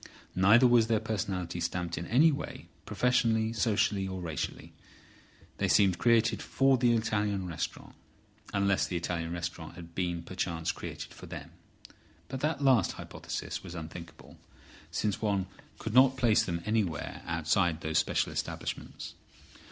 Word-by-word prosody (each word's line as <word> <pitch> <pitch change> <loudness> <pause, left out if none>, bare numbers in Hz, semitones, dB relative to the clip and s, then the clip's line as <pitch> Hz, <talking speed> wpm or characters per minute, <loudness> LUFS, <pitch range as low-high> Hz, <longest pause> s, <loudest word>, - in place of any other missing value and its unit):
Neither 105 +7 +6
was 120 -2 +5
their 115 -2 +2
personality 95 -5 -3
stamped 85 -1 -2
in 85 - -5
any 150 +8 +5
way, 145 - -5 0.2
professionally, 115 -3 +2
socially 105 -3 +1
or 95 -1 -4
racially. 80 -5 -4 0.8
They - - +1
seemed 95 -3 +4
created 115 -1 +3
for 135 0 +3
the 120 -1 +4
Italian 105 -3 0
restaurant, 85 -3 -5 0.6
unless 100 -1 +2
the 90 - -4
Italian 85 -1 -3
restaurant 85 -1 -5
had 85 -1 -11
been 85 -2 -2
perchance 85 -2 -2
created - - -7
for - - -11
them. - - -8 0.8
But 130 0 -4
that 150 0 -1
last 130 -9 +4
hypothesis - - -6
was 90 -2 -8
unthinkable, 85 +1 -9 0.5
since 105 -2 -1
one 100 -3 +1 0.3
could 110 - -5
not 130 +1 +6
place 115 -4 +4
them 85 -1 -3
anywhere 105 -8 -1
outside 85 +1 +1
those 80 0 +1
special - - 0
establishments. - - -5
100 Hz, 140 wpm, -30 LUFS, 85-115 Hz, 0.8 s, Neither